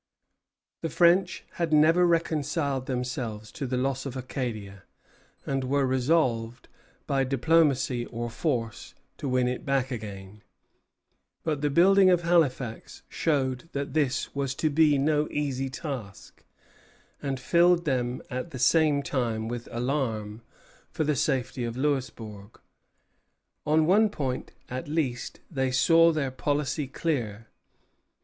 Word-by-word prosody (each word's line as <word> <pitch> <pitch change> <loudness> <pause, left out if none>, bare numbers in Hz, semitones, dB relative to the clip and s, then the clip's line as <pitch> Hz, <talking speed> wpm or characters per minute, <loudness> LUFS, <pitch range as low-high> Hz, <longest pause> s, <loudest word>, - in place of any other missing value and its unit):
The 165 - -2
French 175 +5 +3 0.2
had 165 -2 0
never 165 +4 +5
reconciled 150 -5 0
themselves 125 -4 -4
to 140 - -5
the 125 0 -1
loss 135 +1 -1
of 130 -1 -6
Acadia, 110 -7 -5 0.6
and 135 -1 -1
were 135 +1 +1
resolved, 130 -3 0 0.4
by 135 -1 +1
diplomacy 135 -2 +2
or 120 0 -4
force, 115 -5 -3 0.2
to 140 - -4
win 125 -1 +2
it 125 0 -3
back 135 -1 0
again; 105 -3 -7 1.0
but 150 -3 -1
the 150 - +1
building 190 +5 +5
of 175 -1 +3
Halifax 140 -9 0
showed 135 -1 -1
that 140 -1 -3
this 140 -4 0
was 140 -2 -2
to 155 +1 0
be 150 -1 +4
no 150 +2 +1
easy 135 -2 -2
task, 130 - -7 0.8
and 135 -2 -3
filled 175 +4 +3
them 125 -3 -1
at 125 +6 -4
the 135 - -7
same 145 +2 +3
time 115 -5 -2
with 120 0 -5
alarm 120 -4 -2 0.5
for - - -2
the 150 -1 +1
safety 130 -2 -1
of 120 0 -4
Louisbourg. 115 -7 -3 1.1
On 155 +1 +4
one 210 +6 +4
point, 135 -9 -4 0.2
at 130 +2 -5
least, 145 -6 -2
they 130 -4 0
saw 165 +6 +5
their 145 -4 -1
policy 145 +1 -1
clear. 125 - -3
135 Hz, 130 wpm, -27 LUFS, 125-155 Hz, 1.1 s, never